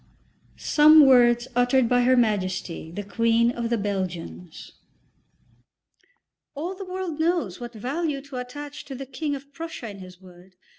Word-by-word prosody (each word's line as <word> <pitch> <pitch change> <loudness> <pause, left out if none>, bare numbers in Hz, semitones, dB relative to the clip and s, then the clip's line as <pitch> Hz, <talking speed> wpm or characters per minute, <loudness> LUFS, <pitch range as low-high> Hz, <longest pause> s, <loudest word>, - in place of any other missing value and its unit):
XII - - -15
SOME 305 0 +7
WORDS 240 -2 +5
UTTERED 245 0 +3
BY 245 +1 +3
HER 255 +1 +4
MAJESTY, 185 -7 -1
THE 205 +5 -6
QUEEN 230 +3 +2
OF 235 -1 -4
THE 235 - +1
BELGIANS 185 -4 -5 1.8
"All 330 +6 -4
the 390 +1 -8
world 365 -4 -5
knows 320 - 0
what 240 -1 -8
value 280 +6 -2
to 280 -2 -9
attach 285 +4 -7
to 270 - -8
the 270 +1 -7
King 285 +3 -3
of 280 +1 -12
Prussia 330 -5 -7
and 200 -3 -8
his 185 -1 -12
word. 185 0 -17
245 Hz, 155 wpm, -24 LUFS, 205-290 Hz, 1.8 s, SOME